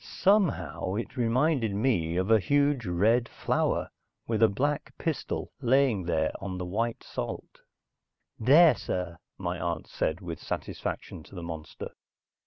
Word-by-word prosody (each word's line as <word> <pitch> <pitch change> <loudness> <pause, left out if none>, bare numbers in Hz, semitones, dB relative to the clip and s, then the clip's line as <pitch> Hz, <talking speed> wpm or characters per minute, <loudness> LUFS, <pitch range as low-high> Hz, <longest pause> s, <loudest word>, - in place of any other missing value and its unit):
Somehow, 195 - +1
it 115 +3 -4
reminded 125 -2 +2
me 100 -8 +1
of 95 +4 +1
a 110 - +7
huge 140 0 +2
red 110 +7 +2
flower - - 0 0.3
with 110 -2 -1
a 115 - +8
black 145 +8 -1
pistil 160 -3 -3
laying 125 -6 +3
there 80 -2 +1
on 95 -1 -4
the 90 - -3
white 115 +6 -2
salt. - - -6 0.8
"There, 150 +8 +7
sir," 90 -2 -4 0.2
my 90 -2 -3
aunt 85 -1 -2
said 80 +2 -2
with 85 -4 -6
satisfaction - - -4
to 90 - -15
the 85 - -6
monster. 80 -2 -6
110 Hz, 140 wpm, -28 LUFS, 90-130 Hz, 0.8 s, a